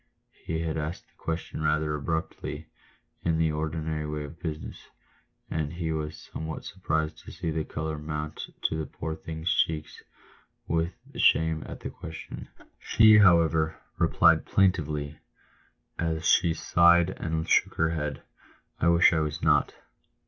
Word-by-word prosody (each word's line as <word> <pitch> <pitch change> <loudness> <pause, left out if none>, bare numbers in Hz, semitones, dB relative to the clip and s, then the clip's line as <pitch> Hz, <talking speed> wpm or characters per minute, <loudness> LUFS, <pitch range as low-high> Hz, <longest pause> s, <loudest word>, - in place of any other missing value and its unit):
He 80 0 -2
had 80 -1 -2
asked 75 +2 -4
the - - -33
question 80 -1 -4
rather 75 0 +1
abruptly 80 +2 -3 0.3
— - - -42
in 80 -1 +1
the 80 -1 +2
ordinary 75 0 -3
way 75 0 -3
of 75 +3 -10
business 80 -3 -6 0.3
— - - -34
and 75 -1 -2
he 85 -2 -2
was 75 -1 -3 0.2
somewhat 80 0 -5
surprised 80 0 -2
to - - -11
see 80 - -3
the 80 0 -1
colour 80 0 -4
mount 75 0 -5
to - - +1
the 80 -1 -3
poor 80 0 -5
thing's 80 +2 -3
cheeks 80 -1 -1 0.7
with 85 +2 0 0.2
shame 80 -1 +3
at - - -8
the - - -5
question. 80 0 -8 0.3
She, 110 -1 +6
however, 80 -5 +4 0.2
replied 80 -1 +4
plaintively, 75 -6 +1 0.8
as 80 -1 -1
she 85 -2 +4
sighed 85 +1 +4
and 80 -2 -3
shook - - +3
her 80 0 +2
head, 75 -3 -3 0.6
"I 85 - +2
wish 85 +1 +6
I 80 - +2
was 75 -1 -3
not." - - +3
80 Hz, 150 wpm, -27 LUFS, 75-80 Hz, 0.8 s, She